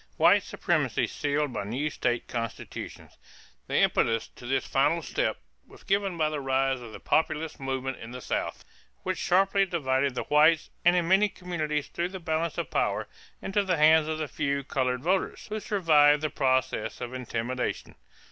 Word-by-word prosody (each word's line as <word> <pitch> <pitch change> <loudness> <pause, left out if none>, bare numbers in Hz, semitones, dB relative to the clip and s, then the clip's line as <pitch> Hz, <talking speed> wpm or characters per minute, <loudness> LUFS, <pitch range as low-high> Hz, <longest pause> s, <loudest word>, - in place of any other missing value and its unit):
=White - - +6
Supremacy - - 0
Sealed 145 -1 -1
by - - -3
New 130 +9 -2
State 120 -3 -1
Constitutions.= 115 -1 -6 0.5
The - - 0
impetus 115 -1 +2
to 120 - -12
this 135 +1 0
final 150 +5 +1
step - - -1 0.3
was - - -17
given 195 -2 0
by 155 -1 +2
the 150 -2 -3
rise 135 -1 0
of 115 -2 -9
the - - -9
Populist 155 0 0
movement 135 -1 -3
in 115 - -9
the 125 +1 -7
South, - - -3 0.4
which 185 0 -2
sharply 195 +2 +3
divided 140 -7 0
the - - -2
whites 155 +2 +4
and 175 +1 +5
in 175 -2 +1
many 195 +3 +4
communities 155 -6 -3
threw 175 +1 -3
the 190 0 -7
balance 165 -1 -2
of - - -3
power - - 0 0.4
into 195 +2 +1
the 185 -3 0
hands 155 +1 +5
of 155 0 -2
the 155 -1 -3
few 140 +1 -2
colored 130 -1 -1
voters 185 +3 0
who 215 +1 -3
survived 155 -8 +4
the 155 - -1
process 130 -5 0
of 120 0 -6
intimidation. 125 0 -3
150 Hz, 175 wpm, -27 LUFS, 130-170 Hz, 0.5 s, =White